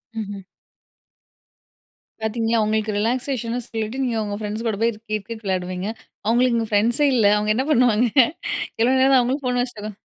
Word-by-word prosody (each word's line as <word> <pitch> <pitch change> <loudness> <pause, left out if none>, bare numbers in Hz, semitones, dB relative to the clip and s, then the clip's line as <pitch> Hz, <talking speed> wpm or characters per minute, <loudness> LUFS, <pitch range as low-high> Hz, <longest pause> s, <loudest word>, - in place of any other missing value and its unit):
மஹ்ம். 205 -2 -5 1.8
பார்த்தீங்களா, 225 +1 0
ஒங்களுக்கு 215 0 0
ரிலாக்சேஷன்னு 245 +1 -1
சொல்லிட்டு 225 +4 -3
நீங்க 240 -3 -1
உங்க 205 -1 -4
பிரண்ட்ஸ் 215 +2 -4
கூட 215 - -1
போய் 230 0 +2 0.2
கிரிக்கெட் 215 +1 -4
விளையாடுவீங்க. 185 0 -2 0.4
அவுங்களுக்கு 240 +1 +3
இங்க 225 -1 -1
பிரண்ட்ஸே 235 +8 +3
இல்ல, 225 -4 +3
அவுங்க 210 0 +1
என்ன 260 - 0
பண்ணுவாங்க 245 -3 +4 0.7
எவ்வளவு 255 +3 +3
நேரம் 265 0 +5
அவங்களும் 260 +3 -1
ஃபோன் 250 0 +1
வச்சிட்டு 215 -4 -5
230 Hz, 145 wpm, -22 LUFS, 215-245 Hz, 1.8 s, நேரம்